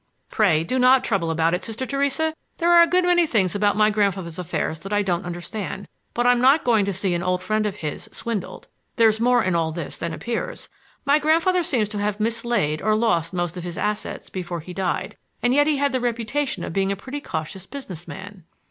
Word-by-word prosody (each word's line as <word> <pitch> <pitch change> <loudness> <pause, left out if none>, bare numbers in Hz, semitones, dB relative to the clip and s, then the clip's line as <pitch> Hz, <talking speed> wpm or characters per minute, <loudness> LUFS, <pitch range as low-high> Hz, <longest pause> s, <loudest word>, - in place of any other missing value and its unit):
"Pray 170 -8 +3
do 255 +10 -1
not 255 +1 +5
trouble 190 -7 0
about 165 +1 +1
it, 180 - -1
Sister 230 +3 -3
Theresa. 280 +3 0 0.2
There 340 +1 +2
are 345 0 +8
a 340 - +6
good 365 +1 +3
many 350 -1 +4
things 195 - +1
about 205 0 +1
my 215 0 +4
grandfather's 195 -5 -1
affairs 160 -2 -2
that 195 +4 -9
I 205 0 +2
don't 175 -1 -1
understand, 190 +3 -5 0.3
but 240 - +1
I'm 245 0 +4
not 275 +5 +5
going 225 -5 +3
to 200 - -1
see 190 -1 -1
an 175 - -1
old 180 0 -1
friend 215 +2 0
of 200 - -4
his 150 -2 -6
swindled. 225 -6 -5 0.3
There's 220 -1 +4
more 245 0 +3
in 185 - 0
all 165 -1 +1
this 160 -2 -6
than 170 0 -3
appears. 240 - -4 0.4
My 285 +2 +4
grandfather 330 +4 +3
seems 245 -10 0
to 210 -1 -4
have 205 0 -1
mislaid 225 -8 0
or 215 0 +2
lost 195 -8 +1
most 175 -1 -2
of 175 - -5
his 175 -1 -6
assets 210 0 -3
before 175 -2 -4
he 180 +3 -9
died. 185 -1 -2 0.3
And 245 +1 +3
yet 290 +2 +4
he 305 -2 +2
had 285 0 +1
the 255 -1 -1
reputation 240 -2 -1
of - - -5
being 195 +1 +1
a - - 0
pretty 265 +8 -7
cautious 180 - -5
business 185 - -8
man." 190 -2 -9
210 Hz, 220 wpm, -23 LUFS, 180-250 Hz, 0.4 s, are